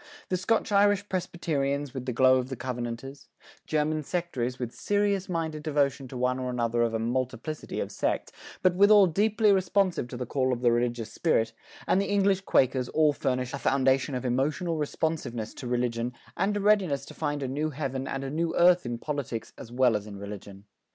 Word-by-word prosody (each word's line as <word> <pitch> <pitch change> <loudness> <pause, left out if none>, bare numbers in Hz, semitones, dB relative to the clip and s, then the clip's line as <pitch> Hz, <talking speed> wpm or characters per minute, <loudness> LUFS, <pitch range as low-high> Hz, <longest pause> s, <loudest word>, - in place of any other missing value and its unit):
The 185 - +1
Scotch 220 +4 0
Irish 205 0 +3
Presbyterians 145 -6 -2
with 130 -1 -6
the - - 0
glow 130 +2 +5
of 130 0 -2
the 130 - -4
covenanters; 125 +2 -5 0.4
German 155 0 0
sectaries 135 -7 -3
with 125 -2 -5
serious 205 -2 0
minded 160 -3 -2
devotion 140 -3 0
to 130 - -7
one 125 +1 0
or 130 -1 -3
another 120 -1 0
of 115 -1 +1
a - - +2
multiplicity 130 +6 -3
of - - -3
sects, - - -2 0.3
but 185 - +5
withal 200 +2 +7
deeply 210 +4 +2
responsive 190 -5 +1
to 125 - -7
the 125 - -3
call 130 +1 0
of 120 - -4
the 120 -1 +4
religious 120 -2 -1
spirit, 115 -9 +1 0.3
and 190 - +3
the 200 - -2
English 200 -1 +2
Quakers 130 -7 +2
all 155 -2 +3
furnish 130 -2 -2
a 140 - -3
foundation 135 0 +2
of 125 - -4
emotional 150 +7 0
responsiveness 140 -7 -2
to 125 - -7
religion 120 0 -1 0.2
and 205 +1 0
a - - -2
readiness 190 -10 +2
to - - -11
find 145 -2 -2
a - - -2
new 145 +4 -1
heaven 135 -2 -4
and 135 0 -3
a 135 - -4
new 165 +2 -1
earth 175 -4 +5
in 120 -1 -3
politics 120 -5 -4
as 115 - -11
well 125 -2 +3
as 105 0 -3
in 100 -1 -8
religion. 100 -1 -9
135 Hz, 195 wpm, -28 LUFS, 125-170 Hz, 0.4 s, withal